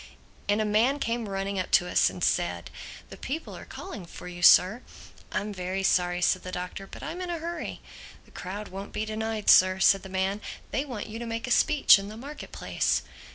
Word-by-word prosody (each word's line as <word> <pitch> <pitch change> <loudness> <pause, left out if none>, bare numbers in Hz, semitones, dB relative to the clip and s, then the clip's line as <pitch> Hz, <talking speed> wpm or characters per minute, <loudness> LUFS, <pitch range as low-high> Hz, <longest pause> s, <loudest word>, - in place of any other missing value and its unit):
And 205 +1 +3
a 215 - +1
man 225 +7 +3
came 230 -5 -2
running 195 0 -2
up 185 - -3
to 180 - +5
us - - +3
and - - -7
said, - - 0 0.4
"The - - -9
people 310 +4 -5
are - - -10
calling 285 - -8
for - - -10
you, 175 0 -8
Sir." 185 +6 +6 0.5
"I'm 205 +2 -2
very 185 +1 -3
sorry," 180 -1 +2
said 185 - +3
the 185 - -7
Doctor, 180 +2 -6
"but - - -11
I'm 345 +3 -5
in 360 - -4
a 345 - -2
hurry." 340 +2 -5 0.4
"The - - -22
crowd 200 +3 -6
won't 195 +2 -8
be 215 - -2
denied, 220 0 -3
Sir," 185 0 +7
said 195 0 +5
the 190 - -10
man. 190 +2 -1 0.3
"They 275 - -1
want 245 -7 -5
you 220 +1 -7
to 235 - -5
make 230 0 -3
a 250 - -5
speech 280 -3 +6
in 200 +1 -7
the 215 - -9
market 285 +5 -9
place." - - 0
205 Hz, 215 wpm, -27 LUFS, 190-235 Hz, 0.5 s, Sir